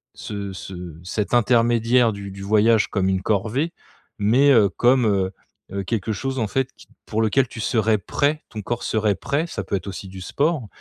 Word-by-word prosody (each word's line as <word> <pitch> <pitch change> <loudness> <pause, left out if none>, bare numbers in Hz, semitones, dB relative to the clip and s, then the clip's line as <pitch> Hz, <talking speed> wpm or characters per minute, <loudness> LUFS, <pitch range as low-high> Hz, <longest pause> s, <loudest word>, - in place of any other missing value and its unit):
ce 100 -1 -5
ce 90 -3 -8
cet 100 +5 -3
intermédiaire 120 0 +3
du 100 -1 -7
du 95 - -9
voyage 110 +2 +4
comme 95 -2 0
une 95 0 0
corvée, 110 - 0 0.5
mais, 125 +8 +4
heu, 110 -6 +6
comme, 125 +3 +3
heu 95 -2 +1 0.4
heu, 100 0 -3
quelque 110 +1 -2
chose 135 +6 -3
en 110 - 0
fait 135 +3 -1
qui - - -16
t - - -26
pour 110 +1 -1
lequel 120 +4 +2
tu 115 - -8
serais 110 -1 +2
prêt, 145 - 0
ton 110 -2 -6
corps 120 +4 -3
serait 105 -2 +1
prêt, 150 - -1
ça - - -5
peut - - -2
être 95 +1 -4
aussi 95 0 -6
du 95 0 -9
sport, 140 - 0
110 Hz, 200 wpm, -22 LUFS, 100-125 Hz, 0.5 s, heu